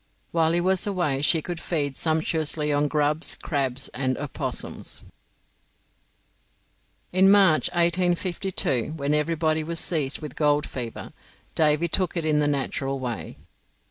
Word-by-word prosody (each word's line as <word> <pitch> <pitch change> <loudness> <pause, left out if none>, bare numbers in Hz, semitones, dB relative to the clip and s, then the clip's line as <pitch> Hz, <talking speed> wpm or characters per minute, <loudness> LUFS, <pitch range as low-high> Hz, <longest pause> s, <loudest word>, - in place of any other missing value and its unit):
While 165 -1 +2
he 175 - +2
was 185 +2 +1
away 175 -9 -1
she 155 +1 +2
could 175 -2 -5
feed 145 -6 -2
sumptuously 155 -1 +1
on 145 +1 +2
grubs, 150 +2 +2
crabs, 135 -4 -2
and 130 -1 -2
opossums. 145 -1 -5 2.1
In 190 +1 +5
March, 195 -6 +5
1852, 175 - 0
when 145 -1 -1
everybody 155 +1 +1
was 165 +1 -3
seized 145 -5 -1
with 150 -2 -7
the - - -18
gold 150 -1 +2
fever, 120 -3 -7 0.4
Davy 155 +1 +2
took 180 +1 0
it 165 - -1
in 150 -1 +2
the 150 - +2
natural 135 -1 -2
way. 125 -3 -5
155 Hz, 135 wpm, -25 LUFS, 145-170 Hz, 2.1 s, In